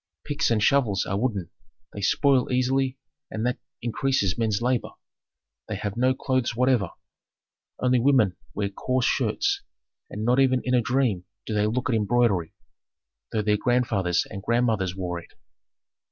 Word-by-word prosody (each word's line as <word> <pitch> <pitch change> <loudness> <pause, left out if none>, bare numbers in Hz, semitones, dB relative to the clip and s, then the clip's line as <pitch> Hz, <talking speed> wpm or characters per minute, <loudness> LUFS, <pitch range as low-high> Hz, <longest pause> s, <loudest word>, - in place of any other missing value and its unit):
Picks 150 +2 0
and 110 -2 +2
shovels 110 -9 +2
are 100 - -2
wooden, 105 -8 -2 0.4
they 100 - -6
spoil 130 +5 +2
easily 130 +1 +1 0.3
and 110 +1 -3
that 125 0 -1 0.2
increases 120 -5 0
men's 110 -3 0
labor. 125 0 0 0.8
They - - -3
have 105 -1 -4
no 130 +2 +2
clothes 130 -3 -1
whatever; 125 -6 +2 0.9
only 125 -1 +3
women 125 -8 +3 0.2
wear 100 -1 -1
coarse 125 +5 -1
shirts, 400 0 +1 0.5
and 105 +1 -4
not 125 +3 +3
even 130 -2 +3
in 125 - -1
a 125 - +4
dream 120 -7 0 0.2
do 110 - -4
they 105 0 +2
look 125 +4 -1
at 125 - +1
embroidery, 105 -5 +1 0.8
though 110 -1 0
their 105 0 +2
grandfathers 105 -7 +1
and 100 -2 -7
grandmothers 110 -5 +1
wore 90 -2 -3
it. 85 - -16
120 Hz, 155 wpm, -25 LUFS, 105-130 Hz, 0.9 s, a